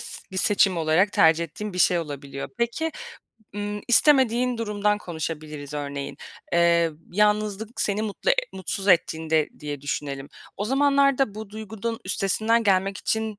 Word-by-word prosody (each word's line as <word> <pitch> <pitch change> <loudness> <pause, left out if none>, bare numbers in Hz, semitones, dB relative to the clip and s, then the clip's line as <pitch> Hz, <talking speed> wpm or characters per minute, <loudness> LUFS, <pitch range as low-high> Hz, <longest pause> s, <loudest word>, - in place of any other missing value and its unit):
s - - -8
bir - - -6
seçim 195 -1 +3
olarak 165 +5 +2
tercih 165 +1 +4
ettiğin 210 +6 -7
bir 180 - -6
şey 180 -1 +4
olabiliyor. 140 -3 -6
Peki, 235 +8 -1 0.6
ımm, 205 0 -4
istemediğin 250 -2 +4
durumdan 210 -2 0
konuşabiliriz 155 -4 -6
örneğin. 140 -1 -5 0.4
Eee, 170 -1 +4 0.2
yalnızlık 210 +2 0
seni 205 +1 0
mutlu 220 - -1
e - - +6 0.2
mutsuz 195 +1 -4
ettiğinde 160 -3 +2
diye 145 -2 -5
düşünelim. 140 0 -4 0.3
O 205 - -2
zamanlarda 275 -1 +3
bu 215 -1 -8
duygunun 220 +2 -5
üstesinden 220 +5 +1
gelmek 195 -1 +2
için 220 -2 -2
200 Hz, 140 wpm, -24 LUFS, 160-220 Hz, 0.6 s, e